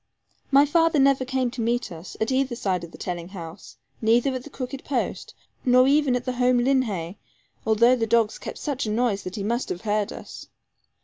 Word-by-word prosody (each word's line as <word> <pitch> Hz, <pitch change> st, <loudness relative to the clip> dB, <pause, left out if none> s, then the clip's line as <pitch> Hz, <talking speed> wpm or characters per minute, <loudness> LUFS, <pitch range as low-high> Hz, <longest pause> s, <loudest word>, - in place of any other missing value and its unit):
My 280 Hz, +1 st, +6 dB
father 330 Hz, +1 st, +3 dB
never 275 Hz, -1 st, +4 dB
came 260 Hz, -1 st, -1 dB
to 250 Hz, -1 st, -5 dB
meet 240 Hz, 0 st, -1 dB
us, 165 Hz, +1 st, -9 dB
at 220 Hz, +4 st, 0 dB
either 260 Hz, -1 st, +1 dB
side 190 Hz, -6 st, -1 dB
of 170 Hz, -, -8 dB
the -, -, -12 dB
telling 175 Hz, -2 st, -5 dB
house, 170 Hz, -1 st, -10 dB, 0.2 s
neither 235 Hz, +4 st, +3 dB
at 255 Hz, -1 st, -4 dB
the 295 Hz, -, -10 dB
crooked 270 Hz, 0 st, -6 dB
post, 265 Hz, -4 st, -3 dB, 0.3 s
nor 255 Hz, 0 st, +5 dB
even 280 Hz, -2 st, +3 dB
at 245 Hz, -, -3 dB
home 250 Hz, -1 st, +2 dB
linhay 225 Hz, -9 st, 0 dB, 0.5 s
although 235 Hz, +3 st, +5 dB
the 225 Hz, -2 st, -1 dB
dogs 225 Hz, -1 st, +2 dB
kept -, -, -7 dB
such 280 Hz, -6 st, -3 dB
a -, -, -1 dB
noise 220 Hz, -3 st, +1 dB
that 185 Hz, 0 st, -7 dB
he 200 Hz, -, -4 dB
must 235 Hz, +4 st, -1 dB
have 175 Hz, -, -4 dB
heard 210 Hz, 0 st, 0 dB
us. -, -, -9 dB
245 Hz, 200 wpm, -24 LUFS, 210-260 Hz, 0.5 s, My